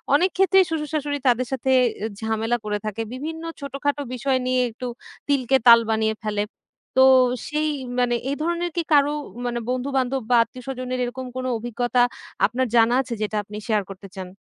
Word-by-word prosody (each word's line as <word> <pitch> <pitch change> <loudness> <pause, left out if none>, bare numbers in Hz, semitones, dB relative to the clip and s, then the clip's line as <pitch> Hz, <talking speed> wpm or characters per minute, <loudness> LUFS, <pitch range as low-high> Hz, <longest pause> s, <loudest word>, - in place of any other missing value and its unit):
অনেক 365 +5 +3
ক্ষেত্রেই 385 0 +5
শ্বশুর-শাশুড়ি 300 -2 -2
তাদের 250 +1 +3
সাথে 265 0 0 0.3
অ্যা 220 +2 -3
ঝামেলা 225 +2 0
করে 210 0 -1
থাকে। 215 +1 -3
বিভিন্ন 320 +5 -5 0.2
ছোটখাটো 280 +1 -2
বিষয় 260 +1 0
নিয়ে 255 0 +2
একটু 245 +3 -7 0.4
তিলকে 270 -2 +3
তাল 235 0 +10
বানিয়ে 220 0 +1
ফেলে। 210 -1 0 0.5
তো 260 - +8 0.5
সেই 305 +1 0 0.3
মানে 240 -1 +2 0.2
এ - - +1
ধরনের 345 +1 -1
কি 340 - +1
কারো 290 0 +5 0.3
মানে 240 0 -1
বন্ধু-বান্ধব 260 0 0
বা - - +6
আত্মীয়স্বজনের 255 0 -6
এরকম 255 +2 -4
কোন 255 0 -3
অভিজ্ঞতা 240 +2 0 0.4
আপনার 255 +1 0
জানা 235 +1 +5
আছে 245 -2 -6
যেটা 215 0 -1
আপনি 210 +1 -9
শেয়ার 210 -3 +1
করতে 195 0 -9
চান? 185 -1 -6
255 Hz, 165 wpm, -23 LUFS, 230-280 Hz, 0.5 s, তাল